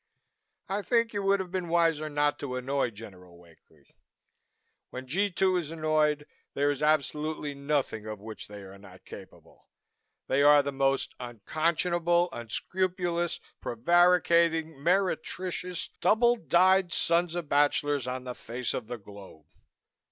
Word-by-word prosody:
I 200 +2 -2
think 230 +1 +1
you 205 - -2
would 195 0 +2
have 185 -2 -5
been 185 -2 -3
wiser 165 -2 +2
not 145 0 0
to 130 -3 -4
annoy 130 0 -1
General 95 -5 -13
Wakely. 85 -2 -23 1.0
When 130 +1 -7
G 195 +10 0
2 185 0 +1
is 165 -4 -3
annoyed, 155 -2 0 0.3
there 145 +1 +2
is 145 - -5
absolutely 150 0 0
nothing 140 -6 -2
of 110 -1 -6
which 110 +1 -9
they 105 -1 -10
are 95 +1 -12
not 95 -2 -16
capable. - - -14 0.6
They 135 - +1
are 145 0 +6
the 140 - -3
most 135 0 0
unconscionable, 170 - 0
unscrupulous, 175 - -2 0.2
prevaricating, 170 +3 +3
meretricious 180 0 -1
double 235 +6 +4
dyed 185 -2 +3
sons 170 0 +1
of 175 -3 -4
bachelors 145 -2 +1
on 125 0 -4
the 125 -1 -5
face 120 +1 -5
of - - -4
the 120 0 -5
globe. 100 -7 -14
150 Hz, 135 wpm, -28 LUFS, 125-175 Hz, 1.0 s, are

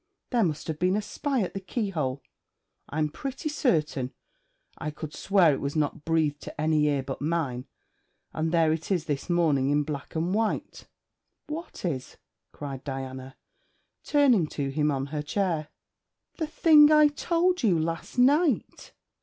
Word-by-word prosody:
There 240 -3 +3
must 155 -5 -1
have 155 -2 -4
been 185 +3 +2
a - - +1
spy 270 0 -1
at 180 - -4
the 195 - -3
keyhole. 175 - -3 0.7
I'm 155 +1 0
pretty 270 - -5
certain 155 - 0 0.7
I 155 - -3
could 150 0 -7
swear 185 -6 +3
it - - -3
was 140 +2 -3
not 150 0 -1
breathed 155 -3 +1
to - - -9
any 155 -1 +2
ear 140 -2 +1
but 135 0 -6
mine; 145 -5 -2 0.7
and 160 +1 -1
there 165 -2 +3
it 160 0 -5
is 180 -5 0
this 145 +2 -3
morning 155 -6 +2
in 145 +1 +2
black 145 0 -6
and 170 +3 0
white.' 220 +1 -2 0.6
'What 310 - -7
is?' 135 -7 -4 0.3
cried 135 -2 -7
Diana, 130 -1 -6 0.7
turning 260 - +4
to 140 -2 -3
him 150 +2 +1
on 135 -2 -1
her 150 - -1
chair. 160 -1 -1 0.7
'The 320 - -1
thing 305 -1 +6
I 305 -1 +7
told 345 +4 +1
you 200 -9 +3
last 165 +7 -3
night.' 280 - +2
160 Hz, 160 wpm, -27 LUFS, 145-220 Hz, 0.7 s, I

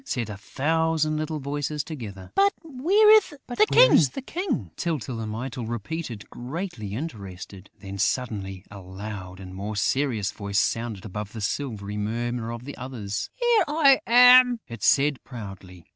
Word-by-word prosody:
said 115 -4 -3
a - - -6
thousand 155 +7 0
little 155 0 -3
voices 145 +1 -3
together. 100 - -8
"But 200 0 +4
where 330 +9 +3
is 435 -2 +6 0.8
the 270 - -7
King?" 315 - -3
Tyltyl 140 -8 -3
and 110 -1 -4
Mytyl 120 +1 -5
repeated, 120 0 -5
greatly 125 - -5
interested. 100 - -7
Then, 100 -1 -7
suddenly, 100 -5 -2
a 100 - -9
louder 95 0 -8
and 95 0 -9
more 100 +3 -5
serious 115 -2 0
voice 100 -1 -4
sounded 115 -1 -1
above 105 0 -6
the 115 - -6
silvery 105 -3 -3
murmur 115 +2 -2
of 120 +1 -7
the 140 - -7
others: 115 -5 -5
"Here 480 -2 +3
I 290 -3 +5
am!" 250 0 +7
it 115 -2 -9
said 140 +3 +3
proudly. 95 -7 -10
120 Hz, 145 wpm, -25 LUFS, 100-155 Hz, 0.8 s, am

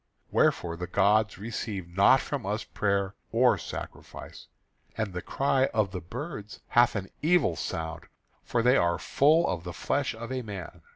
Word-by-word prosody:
Wherefore 85 -1 +2
the 90 +1 -4
gods 105 +3 +2
receive 105 -3 -5
not 100 +9 +5
from 140 -5 -4
us 105 +3 -2
prayer 100 -1 -1 0.2
or - - +4
sacrifice; - - -8 0.5
and 110 -4 -2
the 90 - -3
cry 135 +3 +1
of 105 -4 +2
the 90 -2 -5
birds 110 - -7
hath 120 0 +4
an 95 -2 -3
evil 155 - +3
sound, 80 +1 -5 0.4
for 120 -1 0
they 125 +3 +5
are 85 0 +2
full 155 +4 +3
of 85 -2 -2
the 90 -1 -6
flesh 140 +5 -1
of 115 +2 -7
a 130 -1 -2
man. 100 -7 -8
105 Hz, 165 wpm, -28 LUFS, 90-125 Hz, 0.5 s, not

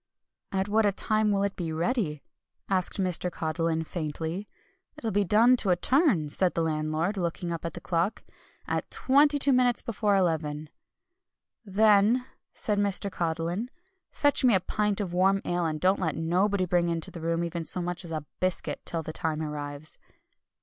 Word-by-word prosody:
"'At 190 0 0
what 205 -1 +2
time 215 -1 +1
will 200 -1 +1
it 200 -1 -1
be 170 -3 -4
ready?' 165 - -1 0.4
asked 190 0 0
Mr. 180 -1 0
Codlin 160 0 -1
faintly. 160 +4 -4 0.5
'It'll 230 -7 -3
be 205 +1 +2
done 225 +7 +5
to 205 - 0
a 180 - +5
turn,' 250 - +2
said 180 +5 0
the 165 - +1
landlord, 155 +4 -1
looking 170 -1 -2
up 170 0 -4
at 165 - -4
the - - -5
clock, 175 +5 -1 0.4
'at - - -2
twenty 290 +2 +4
two 280 -1 +3
minutes 250 -1 +2
before 210 -2 0
eleven.' 155 -5 0 1.0
"'Then,' 215 +4 +4 0.3
said 210 -2 -1
Mr. 200 0 +1
Codlin, 170 +6 -2 0.4
'fetch 290 -2 +2
me 245 -5 +5
a - - +4
pint 210 +2 -1
of 190 -4 -3
warm 190 +2 +3
ale, 175 -1 0
and 155 -1 -3
don't 185 +4 +2
let 165 -4 -1
nobody 185 +4 +1
bring 175 -1 +1
into 165 -1 -2
the 170 - -8
room 165 +1 0
even 170 0 -3
so 170 - -1
much 175 +1 -3
as 170 - -8
a 155 -2 -4
biscuit 185 -1 -2
till 165 -1 -1
the 155 - -6
time 160 -1 -2
arrives.'" 145 0 -5
180 Hz, 175 wpm, -27 LUFS, 165-205 Hz, 1.0 s, done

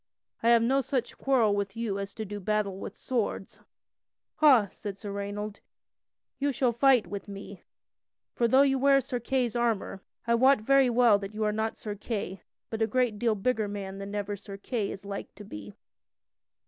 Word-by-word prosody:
I 230 - +3
have 235 -1 +6
no 265 +4 +3
such 250 -2 -2
quarrel 245 -6 +2
with 200 +1 -3
you 215 -4 -2
as 200 0 -6
to 220 - -4
do 205 +1 -6
battle 205 -1 -1
with 200 - -7
swords." 230 -6 -3 0.8
"Ha!" 260 -9 +6
said 200 -2 -7
Sir 205 0 -7
Raynold, 205 +1 -5 0.8
"you 285 +1 +1
shall 255 -1 +1
fight 250 0 +4
with 200 +4 -7
me. 200 -1 -9 0.7
For 235 - +2
though 265 +4 +6
you 270 -1 +2
wear 275 +1 +5
Sir 260 -1 -3
Kay's 245 -1 -1
armor, 230 -5 -1 0.2
I 235 - +2
wot 260 +3 +5
very 270 +2 +4
well 235 -3 +5
that 200 +1 -7
you 215 - -1
are 210 - +2
not 220 +1 -2
Sir 210 - -5
Kay, 200 -2 -4 0.3
but 225 0 -3
a 220 - +3
great 235 -2 0
deal 230 -1 +2
bigger 220 +1 0
man 195 -1 -6
than 200 +1 -6
ever 205 0 -2
Sir 200 0 -10
Kay 210 0 -2
is 195 - -8
like 200 0 -6
to 205 +1 -11
be." 105 - -9
215 Hz, 190 wpm, -28 LUFS, 200-245 Hz, 0.8 s, have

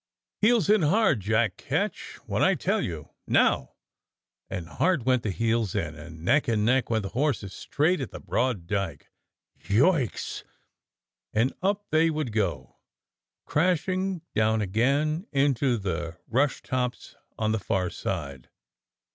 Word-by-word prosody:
"Heels 220 -3 +4
in 210 -1 +5
hard, 160 - +3
Jack 110 0 +1
Ketch, - - -3
when - - -1
I - - +4
tell - - 0
you. 80 -4 -5 0.2
Now! 65 - +2 0.4
" - - -60
And 85 -2 -5
hard 165 - +1
went 130 -2 +3
the 110 - -2
heels 115 0 0
in, 80 -1 -1
and 80 +1 -11
neck 145 +9 +3
to 115 -3 +1
neck 120 +5 +2
went 110 -2 +1
the 100 - -4
horses 120 -6 -1
straight 155 - 0
at 130 - -4
the - - -9
broad 120 -9 -1
dyke. 95 -4 -3 0.5
"Yoikes!" 130 - +1 0.9
And 115 +5 +2
up 200 +2 0
they 160 +1 +4
would 155 -6 -2
go, 90 - -2 0.7
crashing 185 +2 0
down 110 0 +2
again 140 - +1
into 135 -3 +2
the 85 -4 -4
rush 130 +4 +1
tops 125 -1 -3 0.2
on 110 -1 0
the 110 - 0
far 90 -2 -1
side. 70 -9 -5
115 Hz, 145 wpm, -27 LUFS, 100-150 Hz, 0.9 s, in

